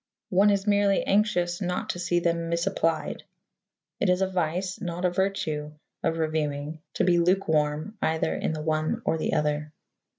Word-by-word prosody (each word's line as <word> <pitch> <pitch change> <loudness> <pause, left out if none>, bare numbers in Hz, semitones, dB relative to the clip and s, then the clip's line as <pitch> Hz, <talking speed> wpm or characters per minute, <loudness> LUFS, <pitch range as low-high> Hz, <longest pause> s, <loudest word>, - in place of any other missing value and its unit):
One 195 +3 +5
is 200 -1 +1
merely 205 -1 +3
anxious 195 -3 +1
not 180 -1 -1
to 175 - -7
see 175 0 +1
them 170 -1 0
misapplied. 170 -2 0 0.8
It 200 - +2
is 180 +1 +3
a - - +2
vice, 180 +1 -2
not 175 0 -3
a 180 - +3
virtue, 170 -6 -1 0.3
of 165 0 0
reviewing 155 -1 -2 0.2
to - - +1
be 175 -1 +4
lukewarm 170 +1 +1
either 160 0 +1
in - - -1
the 155 -1 -4
one 155 0 0
or 160 0 +1
the - - -1
other. 150 0 0
170 Hz, 165 wpm, -27 LUFS, 155-190 Hz, 0.8 s, One